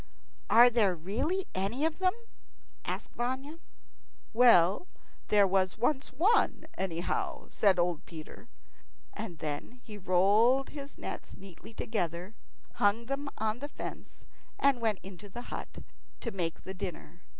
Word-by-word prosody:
"Are 240 +1 +8
there 210 -6 +3
really 245 - -1
any 205 +10 -1
of 320 +1 -1
them?" 370 -1 +3 0.7
asked - - -4
Vanya. 265 +6 -3 0.7
"Well, 220 - +6 0.4
there 205 -1 +5
was 190 0 +1
once 265 +4 +1
one, 365 - +2
anyhow," 195 - -2
said 195 -3 +3
old 175 -3 0
Peter; 165 +8 -10 0.6
and 205 -6 -6
then 155 +11 -5
he 210 -2 -9
rolled 205 +9 +4
his 285 -1 -9
nets - - -7
neatly 195 +3 -13
together, 180 -2 -2 0.5
hung 205 +3 +3
them 275 +3 -3
on 220 +2 -1
the 290 +2 -5
fence, - - -8 0.3
and 275 -3 +3
went 220 -3 +2
into 195 +1 -10
the 240 +5 -7
hut - - -7 0.4
to 230 - -3
make 175 -5 -3
the 190 - -6
dinner. 180 -2 -7
215 Hz, 135 wpm, -31 LUFS, 185-260 Hz, 0.7 s, Are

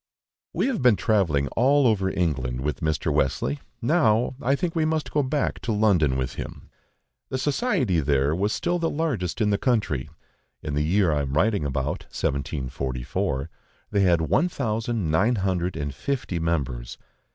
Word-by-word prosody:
WE - - 0
have 260 - -1
been 125 -3 +5
travelling 85 -11 +1
all 135 - +3
over 100 -5 +2
England 65 -9 -1
with 75 -1 -2
Mr. 80 -1 0
Wesley, 75 - 0 0.2
now 120 -5 +3
I 135 +3 +2
think 175 +2 -2
we 160 - +2
must 155 -1 -1
go 150 - +2
back 140 +2 -1
to 115 - -3
London 95 -11 +3
with 65 -1 -2
him. - - -8 0.6
The 130 - -2
society 135 - +1
there 70 0 +2
was 100 +4 0
still 175 +8 0
the 165 -1 0
largest 130 - -2
in 105 -1 +3
the 100 - +1
country: 105 - 0 0.5
in 75 - -3
the 75 - +1
year 90 +3 +2
I 75 - +1
am 70 -1 -3
writing 100 +1 +2
about 70 +1 -2
(1744), 65 0 -3 0.4
they 100 - +2
had 85 -3 +4
one 170 - +2
thousand 110 - -2
nine 105 +10 +3
hundred 95 -4 -1
and 70 -2 -3
fifty 120 - -3
members. 70 -8 -2
95 Hz, 165 wpm, -25 LUFS, -, 0.6 s, been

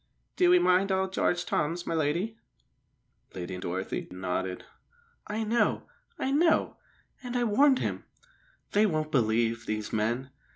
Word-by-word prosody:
"Do 355 -1 +4
'ee 360 - +7
mind 195 - +3
old 190 0 0
Jarge 175 -2 +1
Toms, 170 +4 -1
my - - -2
lady?" 165 +8 0 1.0
Lady 90 0 -5
Dorothy 95 +1 -4
nodded. 90 0 -3 0.6
"I 215 +2 -2
know, 230 +2 +1 0.3
I 265 - -1
know! 320 +3 +2 0.4
And 250 -1 -6
I 245 - +1
warned 260 +5 +4
him! - - -3 0.7
They 210 +1 +4
won't 155 -4 -2
believe, 115 -2 +1
these 110 -1 -3
men! 120 +5 -1
165 Hz, 135 wpm, -28 LUFS, -, 1.0 s, ee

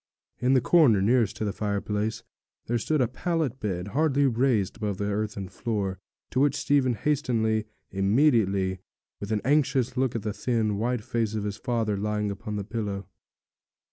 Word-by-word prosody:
In 125 +1 +2
the 130 - +4
corner 135 - +5
nearest 110 +1 +2
to 110 - -3
the 100 - -2
fireplace 105 +1 -2 0.4
there 120 +1 0
stood 155 +5 +1
a 125 - +3
pallet 145 0 -2
bed, 95 -3 -3
hardly 145 +2 +2
raised 120 -5 +1
above 105 -3 -2
the 100 - -2
earthen 105 -1 -2
floor, 100 -2 -3 0.3
to 130 - 0
which 145 0 +3
Stephen 130 -4 +2
hastened 110 -6 0 0.3
immediately, 100 -3 +2 0.4
with 100 +1 -5
an 105 -1 +1
anxious 130 -3 +2
look 130 -2 0
at 115 - -2
the 105 -1 -2
thin, 110 -4 0
white 120 0 -1
face 115 -3 -1
of 105 - -2
his 105 0 -3
father 115 -4 -1
lying 105 0 -1
upon 105 +2 -5
the 100 - -2
pillow. 105 -2 -4
110 Hz, 170 wpm, -27 LUFS, 105-130 Hz, 0.4 s, corner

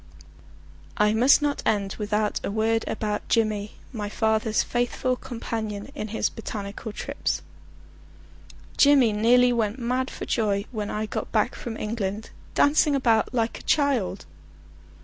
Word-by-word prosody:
I 210 0 +3
must 255 +6 +5
not 290 -1 0
end 200 -2 0
without 210 0 -1
a - - -2
word 220 +2 +1
about 210 -1 -3
Jimmy, 215 -2 +1 0.2
my 210 -3 -4
father's 220 0 +1
faithful 245 +1 -1
companion 225 -2 -5
in 220 -7 -5
his 220 +1 0
botanical 210 -1 -6
trips. - - -3 1.3
Jimmy 275 -6 +5
nearly 245 +3 +4
went 220 -1 0
mad 255 +1 -1
for - - -7
joy 205 -3 0
when 210 -3 -3
I 215 +1 -2
got - - -5
back - - +1
from 230 -2 -6
England, 210 -1 -3 0.2
dancing 290 0 +4
about 230 -5 +2
like 230 -2 -1
a - - -11
child. 275 -10 +1
220 Hz, 135 wpm, -25 LUFS, 210-245 Hz, 1.3 s, must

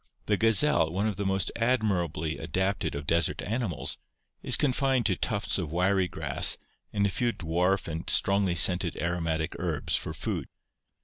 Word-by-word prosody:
The 105 - +2
gazelle, 115 - +4
one 95 +4 -1
of 105 -4 -1
the 100 - -1
most 95 0 0
admirably 95 -10 0
adapted 95 +3 -1
of 70 0 -5
desert 85 +2 +1
animals, 105 - -3 0.4
is - - +3
confined 135 -3 +1
to 100 -4 +3
tufts 100 +1 -1
of 80 -5 -4
wiry 90 +2 +2
grass 75 -6 +1 0.3
and 100 -1 +1
a - - +2
few 120 +5 0
dwarf 90 +1 0
and 80 0 -4
strongly 100 -2 +2
scented 90 +1 +3
aromatic 80 -1 -2
herbs 80 -5 -1
for - - -3
food. - - -3
95 Hz, 160 wpm, -28 LUFS, 85-105 Hz, 0.4 s, gazelle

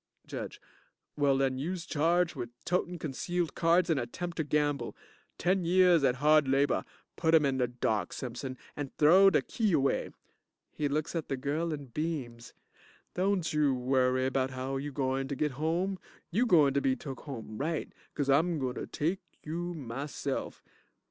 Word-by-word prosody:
JUDGE - - -6 0.6
Well, 140 -2 +3
den 135 -1 +1
youse 170 +4 -3
charged 170 +3 +2
wid 120 -3 -4 0.2
totin' 180 0 0
concealed 165 +3 -2
cards 170 +1 +3
and 160 -5 +2
attempt 170 +9 -5
to 160 - +1
gamble. 145 -1 0 0.4
Ten 185 +1 +1
years 175 -2 +5
at 125 -2 +3
hard 150 +1 +4
labor. 135 +2 +2 0.3
Put 165 -1 +3
him 155 -2 +5
in 135 -1 0
de 125 - +2
dark, 110 -6 -1
Simpson, 130 +1 -5 0.2
and 145 -2 -6
throw 185 +6 +7
de - - +2
key 215 -6 0
away. 135 -3 +1 0.6
(He 150 - -1
looks 150 +4 -2
at 165 - -2
the 135 - -1
girl 150 +5 -1
and 140 -6 -6
beams.) 130 -8 -4 0.6
Don't 185 -2 0
you 150 -3 +3
worry 130 0 +2
bout 130 0 +1
how 130 +1 -3
you 145 +2 -4
gointer 135 0 -1
git 150 +1 0
home. 170 +7 -1 0.3
You 235 +8 +2
gointer 145 - +5
be 130 -1 +2
took 135 +1 -7
home 115 -6 -7
right, 160 +2 -2 0.2
'cause 145 -2 -1
I'm 160 +5 +3
gointer 130 -3 -3
take 170 +6 -1 0.2
you 175 +3 -4
myself. 140 +1 -4
145 Hz, 160 wpm, -30 LUFS, 135-170 Hz, 0.6 s, throw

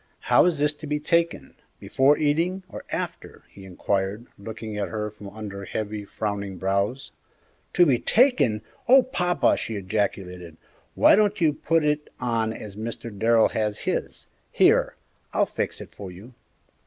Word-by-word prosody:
"How - - +7
is 175 -3 +2
this 150 +1 +2
to 155 - -6
be 150 0 -1
taken, 170 +2 0 0.3
before 135 +3 +3
eating, 165 +6 0
or - - -9
after?" - - -5
he 95 - -13
inquired, 95 +4 -2
looking 110 +1 -7
at 105 -1 -2
her 105 -1 -4
from 105 -1 -11
under 100 -2 -7
heavy, 105 0 -4
frowning 100 -2 -4
brows. 100 +7 -1 0.6
"To 175 - +6
be 130 -7 +3
taken! 220 - +3 0.3
Oh, 265 +1 +8
papa!" 180 -9 +1
she 115 - -4
ejaculated; 95 -4 -3 0.4
"why - - +6
don't 210 0 +2
you 160 -3 +3
put 160 +1 +1
it 150 0 0
on 115 -2 0
as 105 -2 -8
Mr. 115 0 -6
Darrell 115 +2 +4
has 105 -1 -2
his? - - -3 0.3
Here, - - +3 0.4
I'll - - +3
fix - - -4
it - - -10
for 100 -2 -8
you!" 100 +8 -13
110 Hz, 155 wpm, -25 LUFS, 100-150 Hz, 0.6 s, Oh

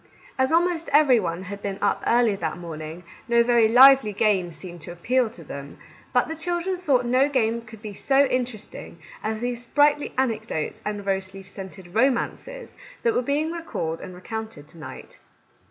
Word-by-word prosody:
As 260 +2 +1
almost 335 0 +1
every 285 -4 +6
one 175 -2 -3
had 200 +2 -7
been 200 -1 -4
up 205 - 0
early 235 -3 +3
that 160 -3 -3
morning, 165 0 -7 0.2
no 235 0 +4
very 235 -2 +4
lively 255 -1 +7
games 190 -5 +1
seemed 175 +2 -10
to 175 - -8
appeal 240 +8 +1
to 175 -6 -12
them; 140 -1 -9 0.3
but 250 -1 +2
the 320 - -4
children 345 +3 -2
thought 285 -9 +1
no 255 +4 +3
game 235 -4 +1
could 220 -1 -14
be 210 -2 -6
so 275 +7 +3
interest 250 -5 -3
ing - - -10 0.3
as 220 +1 -2
these 245 -1 -2
sprightly 290 +4 +2
anecdotes 220 -10 -2
and 205 -1 -4
rose 190 -1 -2
leaf 195 0 -10
scented 190 -2 -9
romances 275 - -1 0.3
that 470 -1 +3
were - - +2
being 290 +5 0
recalled 325 - -4
and 185 - -9
recounted 220 -5 -7
to 165 - -13
night. 155 - -10
225 Hz, 180 wpm, -24 LUFS, 190-270 Hz, 0.3 s, lively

